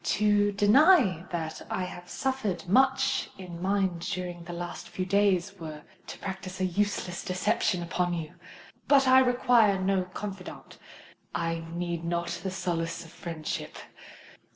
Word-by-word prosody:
"To 205 -1 +3
deny 205 - +5
that 160 -2 -4
I 185 - -1
have 175 -1 -8
suffered 215 -11 -2
much 265 +5 +3
in 175 -3 -8
mind 190 -2 +1
during 175 0 -4
the 175 - -8
last 175 0 -6
few 185 - -3
days, 195 -1 +2
were 155 -2 -7 0.2
to - - -7
practise 190 -1 -6
a 185 - +1
useless 185 -1 -1
deception 180 -1 0
upon 175 +1 -1
you. 160 -2 -5 0.5
But 275 -2 +5
I 260 0 +8
require 245 -5 +4
no 190 -1 +1
confidant—I 180 -3 -7
need 170 -1 -3
not 170 0 -1
the 190 - -3
solace 170 -3 -3
of 165 - -14
friendship. 165 -3 -5
185 Hz, 135 wpm, -28 LUFS, 170-205 Hz, 0.5 s, I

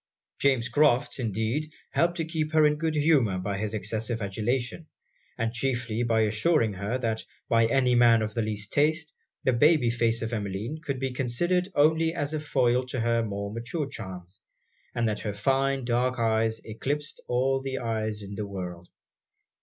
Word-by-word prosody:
James 130 -4 +2
Crofts, 135 0 +2
indeed, 115 +7 -1 0.2
helped 170 +1 +1
to 165 - -1
keep 160 -1 -2
her 155 -1 +6
in 150 0 +3
good 160 0 -1
humour 145 - +3
by 100 +2 -3
his 110 0 -2
excessive 110 +3 -2
adulation; 120 - -2 0.5
and 115 0 -1
chiefly 120 -2 -1
by 115 -2 +2
assuring 110 +2 +2
her, 100 +6 -2
that 110 -3 -2 0.2
by 115 -1 +4
any 125 0 +2
man 120 -2 +5
of 110 -1 -3
the 115 - 0
least 105 -1 -4
taste, 150 +1 +1 0.3
the 130 - +3
baby 145 -1 +4
face 115 -1 +1
of 115 +1 -3
Emmeline 105 +7 -3
could 140 -4 -2
be 130 0 -2
considered 175 +10 0
only 160 +3 +3
as 145 -2 -1
a 155 - -1
foil 130 -4 +2
to 130 0 -3
her 115 0 +2
more 100 -2 -4
mature 120 +7 -3
charms, 95 -6 -8 0.5
and 120 -1 +1
that 105 -1 -1
her 105 - -3
fine 135 +5 +1
dark 125 +1 +1
eyes 110 -1 +1
eclipsed 145 +7 -3
all 135 +2 +1
the 135 0 -3
eyes 110 -3 -2
in 100 0 -8
the 105 0 -4
world. 90 -3 -7
120 Hz, 175 wpm, -27 LUFS, 110-140 Hz, 0.5 s, her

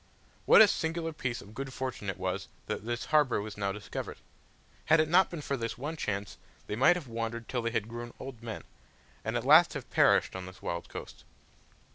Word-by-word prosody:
What - - +10
a - - +6
singular 165 -3 -1
piece 125 -5 -3
of 105 - -13
good 135 +3 -5
fortune 130 -6 -4
it 95 - -3
was 95 +1 -3 0.2
that - - -4
this 120 0 -2
harbour 150 -7 +4
was 105 0 -6
now 100 -1 -1
discovered! 105 +1 -6 0.7
Had 160 +1 +5
it 155 - +3
not 180 +4 +5
been 170 -3 -6
for 140 - -1
this 115 -3 -4
one 145 +6 -4
chance, 100 -9 -3 0.3
they - - -3
might 135 +10 +5
have 170 -6 -5
wandered 115 0 -4
till 125 -2 -2
they 115 - -1
had 115 -2 -1
grown 120 +1 -7
old 130 -3 -8
men, 115 -2 -6 0.6
and 110 +2 -1
at 120 - -3
last 155 +5 +7
have 145 -4 -7
perished - - +4
on 95 -1 -6
this 95 0 -11
wild 85 0 -4
coast. - - -9
120 Hz, 210 wpm, -30 LUFS, 105-150 Hz, 0.7 s, What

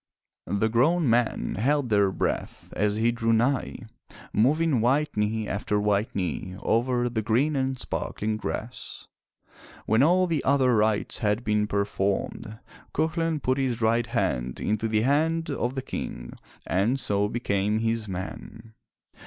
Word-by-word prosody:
The 100 +4 +1
grown 150 +9 +2
men 120 -4 0
held 140 +2 +1
their 100 -2 +3
breath - - -3
as 105 0 +1
he 115 +2 +2
drew 115 -1 0
nigh, 125 +4 +1 0.6
moving 145 +2 +2
white 140 +6 +1
knee 105 +1 0
after 105 +1 -1
white 105 +1 0
knee 90 0 -3
over 120 +3 +1
the 120 -2 -2
green 125 +8 +1
and 130 -1 -1
sparkling 110 -3 -3
grass. 115 +2 -6 0.8
When 110 +2 +3
all 180 +5 +4
the 165 -5 -1
other 130 -3 +3
rites 105 -1 +1
had 105 +1 0
been 105 -1 +1
performed, 100 +2 -2 0.4
Cuchulain 160 0 0
put 130 +1 +1
his 125 -3 -1
right 115 +1 +2
hand 90 - -1
into 110 +1 -1
the 110 -1 +1
right - - 0
hand 160 +3 +1
of 125 -1 -2
the 130 - -3
King - - -6 0.3
and 110 +9 +1
so 105 -3 0
became 105 -3 0
his 115 0 -1
man. 110 +4 -7
115 Hz, 145 wpm, -26 LUFS, 105-130 Hz, 0.8 s, all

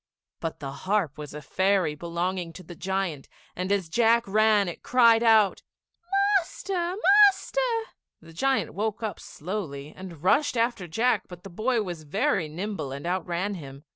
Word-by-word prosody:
But 165 - -5
the 140 -2 -5
harp 180 -1 -1
was 150 -1 -8
a 150 - -8
fairy 190 +1 +1
belonging 170 +2 -3
to 185 - -11
the 175 - -10
giant, 190 -6 -3 0.3
and 185 +2 -3
as 200 -4 +1
Jack 230 +5 +3
ran, 215 0 +3
it 175 - -6
cried 230 -2 +5
out, 220 -4 +4 0.8
"Master! 355 0 -3 0.3
Master!" - - -2 0.5
The 165 0 -15
giant 270 +10 0
woke 215 +2 -3
up 215 - -3
slowly 155 -5 -6
and 175 -5 -10
rushed 280 +6 +2
after 230 -5 0
Jack, 230 +10 +1
but 180 -2 -12
the 195 - -10
boy 225 +5 0
was 175 -4 -6
very 180 - 0
nimble 180 -3 -4
and 140 +4 -7
outran 180 +2 -2
him. 140 -6 -9
190 Hz, 160 wpm, -26 LUFS, 165-225 Hz, 0.8 s, cried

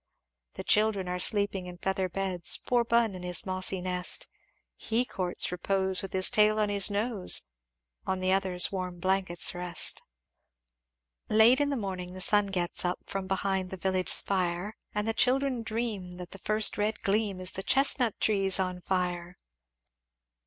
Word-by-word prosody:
"The - - -6
children 210 -3 +2
are 180 0 -3
sleeping 200 -1 -1
in 180 0 -9
feather 190 +1 -2
beds 185 -2 -1
Poor 245 -1 +2
Bun 235 -2 +2
in 185 - -8
his 180 -1 +4
mossy 185 0 -1
nest, 180 0 -1 0.5
He 230 +3 -1
courts 180 -8 -2
repose 190 +1 -1
with 195 - -7
his 185 0 +3
tail 215 0 +3
on 210 -1 +1
his 200 -1 +1
nose. 205 -1 +1 0.6
On 190 0 -1
the 185 0 0
others 190 -2 0
warm 180 -2 -5
blankets 185 -1 +1
rest. 175 -1 +1 1.3
"Late 225 +5 +5
in 285 - +1
the 280 - -1
morning 185 -4 -5
the 185 - -8
sun 205 +1 +2
gets 180 -2 -2
up 180 0 -1
From 195 -1 -5
behind 190 -1 -1
the 190 - -7
village 185 0 -1
spire; 185 +2 +2 0.2
And 210 +1 -1
the 225 - +1
children 260 +1 +1
dream, 220 -5 -4
that 180 -1 -10
the 195 - -10
first 215 +2 +1
red 210 +1 -1
gleam 200 -1 0
Is 185 0 0
the 190 - -6
chestnut 255 -1 +2
trees 195 -3 +1
on 185 -1 -2
fire! 180 -1 -3
190 Hz, 165 wpm, -28 LUFS, 180-215 Hz, 1.3 s, Late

